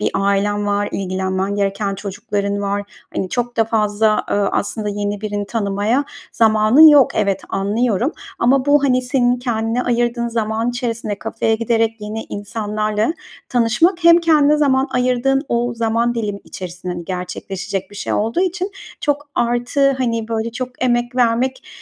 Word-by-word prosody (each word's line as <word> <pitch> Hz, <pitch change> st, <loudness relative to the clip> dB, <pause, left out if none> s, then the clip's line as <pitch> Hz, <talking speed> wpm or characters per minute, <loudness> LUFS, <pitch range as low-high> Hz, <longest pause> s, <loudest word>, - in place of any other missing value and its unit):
bir -, -, 0 dB
ailen 200 Hz, +1 st, +1 dB
var, 205 Hz, 0 st, 0 dB
ilgilenmen 190 Hz, +1 st, -2 dB
gereken 200 Hz, 0 st, -1 dB
çocukların 200 Hz, 0 st, -3 dB
var. 200 Hz, 0 st, -1 dB, 0.3 s
Hani, 190 Hz, -, -2 dB
çok 240 Hz, +3 st, -3 dB
da 225 Hz, -, +3 dB
fazla, 215 Hz, -1 st, +1 dB
ııı, 200 Hz, -1 st, +2 dB
aslında 210 Hz, +1 st, -1 dB
yeni 205 Hz, 0 st, -3 dB
birini 205 Hz, -1 st, -3 dB
tanımaya 210 Hz, +5 st, 0 dB, 0.3 s
zamanın 220 Hz, +7 st, +6 dB
yok. 290 Hz, -4 st, +6 dB
Evet, 200 Hz, -2 st, +1 dB
anlıyorum 215 Hz, -, 0 dB, 0.3 s
ama 260 Hz, +2 st, +2 dB
bu, 285 Hz, 0 st, +4 dB
hani, 255 Hz, -2 st, +2 dB
senin 250 Hz, -1 st, +1 dB
kendine 235 Hz, -1 st, -1 dB
ayırdığın 240 Hz, -1 st, 0 dB
zaman 220 Hz, +2 st, -1 dB
içerisinde 230 Hz, -4 st, -3 dB
kafeye 225 Hz, 0 st, -1 dB
giderek 225 Hz, 0 st, 0 dB
yeni 215 Hz, +1 st, -5 dB
insanlarla 215 Hz, +3 st, -2 dB, 0.4 s
tanışmak, 265 Hz, -, +2 dB
hem 335 Hz, 0 st, +8 dB
kendine 305 Hz, -3 st, +4 dB
zaman 270 Hz, -2 st, +2 dB
ayırdığın 255 Hz, +2 st, +1 dB
o 240 Hz, 0 st, 0 dB
zaman 230 Hz, +1 st, 0 dB
dilimi 210 Hz, -3 st, -3 dB
içerisinde, 180 Hz, 0 st, -7 dB
hani, 175 Hz, -1 st, -6 dB
gerçekleşecek 190 Hz, +2 st, -5 dB
bir 205 Hz, -, -12 dB
şey -, -, -3 dB
olduğu 225 Hz, +10 st, 0 dB
için 370 Hz, +1 st, -1 dB, 0.3 s
çok 290 Hz, 0 st, -1 dB
artı, 245 Hz, +4 st, +1 dB
hani, 230 Hz, -3 st, -1 dB
böyle, 225 Hz, 0 st, -2 dB
çok 255 Hz, +1 st, -4 dB, 0.2 s
emek 240 Hz, 0 st, 0 dB
vermek, 250 Hz, +2 st, +1 dB
225 Hz, 150 wpm, -19 LUFS, 205-250 Hz, 0.4 s, hem